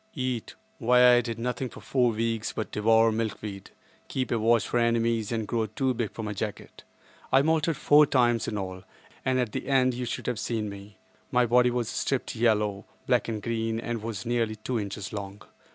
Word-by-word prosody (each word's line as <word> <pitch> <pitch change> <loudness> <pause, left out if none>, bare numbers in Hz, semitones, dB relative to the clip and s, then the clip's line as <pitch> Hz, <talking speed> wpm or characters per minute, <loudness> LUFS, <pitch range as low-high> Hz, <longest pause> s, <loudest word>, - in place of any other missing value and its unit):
Eat! 130 -4 -3 0.2
Why 125 0 +6
I 120 - +5
did 115 -1 -5
nothing 125 +2 -3
for - - -14
about - - -13
four 125 -3 +3
weeks 115 0 -2
but 110 - -4
devour 115 +1 +4
milkweed, 105 -3 -4 0.4
keep 130 -3 -3
a 120 - +1
watch 115 0 +3
out - - -8
for 120 - +2
enemies 115 -2 +1
and 110 -2 -2
grow 115 -2 0
too 130 +5 -1
big 115 -3 -2
for 115 - -7
my 105 -1 -3
jacket. 105 +1 -6 0.5
I 135 +1 +5
moulted 160 0 +1
four 150 0 +5
times 120 -4 +2
in 105 - -2
all, 95 -1 -5 0.4
and 130 0 +1
at 120 -4 -1
the - - -5
end 130 -2 +3
you 125 +1 -4
should 115 - -4
have 125 -3 -2
seen 110 -3 -2
me. 100 +1 -11 0.3
My 125 0 +3
body 125 +1 +4
was 120 -2 -1
striped 135 +1 -2
yellow, 105 -3 +1 0.2
black 125 -4 +2
and 110 -3 -4
green, 115 0 -1
and 120 -1 -4
was 110 -3 -5
nearly 115 -2 0
two 115 +3 -3
inches 100 -1 -5
long. 100 -1 -6
115 Hz, 205 wpm, -27 LUFS, 110-125 Hz, 0.5 s, Why